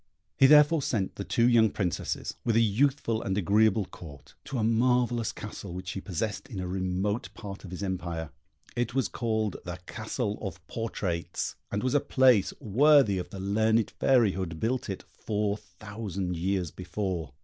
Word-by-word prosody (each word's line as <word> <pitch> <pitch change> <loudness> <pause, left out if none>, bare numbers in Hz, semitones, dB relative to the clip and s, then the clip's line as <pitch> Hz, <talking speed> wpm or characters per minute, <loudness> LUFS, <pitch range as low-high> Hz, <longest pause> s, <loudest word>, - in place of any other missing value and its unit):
He 135 - +6
therefore 150 +2 +6
sent 105 -8 -1
the 100 - -5
two 115 +4 +2
young 115 -2 +5
Princesses, 90 -5 -2
with 115 - +1
a - - +6
youthful 115 +1 +2
and 95 0 -2
agreeable 105 +2 +3
Court, 75 -6 -12
to 140 - -4
a 110 - 0
marvellous 120 0 +2
castle 100 -3 -8
which 90 0 -5
he 95 - -5
possessed 105 +7 -3
in 105 -7 -6
a 90 - -3
remote 95 +5 -2
part 100 -3 -8
of 95 - -8
his 90 +3 -6
empire: 85 -4 -3 0.4
it 120 0 -1
was 130 -6 +2
called 110 -4 -1
the 90 0 -5
Castle 110 +3 -3
of 95 -5 -6
Portraits, 90 -7 -3 0.2
and 105 0 -1
was 130 0 +1
a 145 - +5
place 130 -7 +4
worthy 125 -2 +4
of 90 - -6
the 95 - -8
learned 110 +3 +2
fairy 120 -6 +3
who 95 - -5
had 85 -4 -4
built 120 +3 -1
it 95 - -4
four 105 -1 -2
thousand 100 -4 -5
years 90 -1 -1
before. 90 - -4
105 Hz, 175 wpm, -28 LUFS, 95-115 Hz, 0.4 s, He